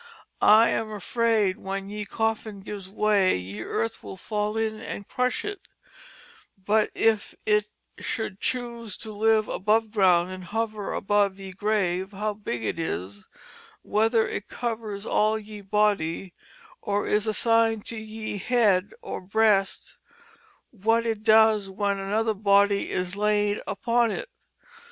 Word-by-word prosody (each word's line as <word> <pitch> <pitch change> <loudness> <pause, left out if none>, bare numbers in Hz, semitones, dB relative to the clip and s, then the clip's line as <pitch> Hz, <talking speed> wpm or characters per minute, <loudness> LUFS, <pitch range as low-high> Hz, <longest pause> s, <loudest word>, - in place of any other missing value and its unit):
I 220 +2 +7
am 220 -1 -1
afraid 215 -1 0
when 195 0 -4
ye 210 0 -4
Coffin 220 -1 -2
gives 195 -1 -7
way 200 - +2
ye 95 +4 -7
Earth 115 +1 -3
will 100 -2 -9
fall 210 0 -2
in 220 -1 -2
and 200 - -6
crush 250 0 -1
it, 410 -2 -6 0.9
but 210 +3 +1
if 220 -2 +1
it 210 -1 +2 0.3
should 220 -4 -4
chuse 235 -4 -3
to 220 - -7
live 215 +1 +2
above 215 +2 +1
Ground 185 -4 +3
and 185 -1 -8
hover 215 +1 -3
above 205 -1 +1
y^e 190 -1 -9
Grave 195 -2 0
how 210 +2 -2
big 200 - -5
it 110 - -2
is, 100 - -4 0.6
whether 220 +2 +2
it 205 - -5
covers 220 -4 -4
all 215 0 +2
ye 210 -1 -9
body, 195 -4 0 0.5
or 205 -1 -1
is 210 +1 +1
assined 225 0 +2
to 230 - -5
y^e 215 -2 -5
Head 210 - +2
or - - -5
Breast, 200 0 +1 0.8
w^t 225 +3 +2
it 225 -2 -1
does 220 -2 +5
when 200 0 -1
another 215 +3 0
Body 200 0 +3
is 180 +1 -2
laid 205 0 +1
upon 230 +4 +1
it. - - -4
210 Hz, 140 wpm, -26 LUFS, 195-220 Hz, 0.9 s, I